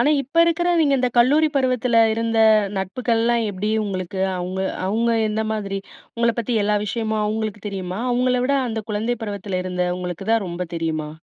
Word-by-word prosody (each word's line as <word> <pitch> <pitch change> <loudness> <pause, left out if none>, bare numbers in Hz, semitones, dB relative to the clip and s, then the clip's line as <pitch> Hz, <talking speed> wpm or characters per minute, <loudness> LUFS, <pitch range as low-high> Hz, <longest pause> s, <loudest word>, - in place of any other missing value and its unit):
ஆனா, 285 - +3
இப்ப 315 +6 +2
இருக்கிறவைங்க, 335 -3 +2
இந்த 250 0 +1
கல்லூரி 290 +6 +5
பருவத்தில 250 -3 +3
இருந்த 230 0 -1 0.4
நட்புகள்லாம் 230 +4 0
எப்டி 205 +2 -3
உங்களுக்கு, 190 -1 -4 0.2
அவங்க 180 +1 -3 0.3
அவங்க 225 +4 +1 0.2
எந்த 220 +1 -1
மாதிரி? 200 -2 -3 0.4
உங்கள 235 0 +2
பத்தி 235 +1 -1
எல்லா 210 0 +2
விஷயமும் 220 +1 -1
அவங்களுக்கு 215 -1 -3
தெரியுமா, 190 0 -5
அவங்கள 250 0 +2
விட 280 +2 +1
அந்த 220 -1 -3
குழந்தை 220 +4 -1
பருவத்தில 200 -3 -3
இருந்தவங்களுக்கு 180 0 -3
தான் 225 -3 +2
ரொம்ப 175 +1 -4
தெரியுமா? 155 -2 -2
220 Hz, 155 wpm, -22 LUFS, 190-240 Hz, 0.4 s, கல்லூரி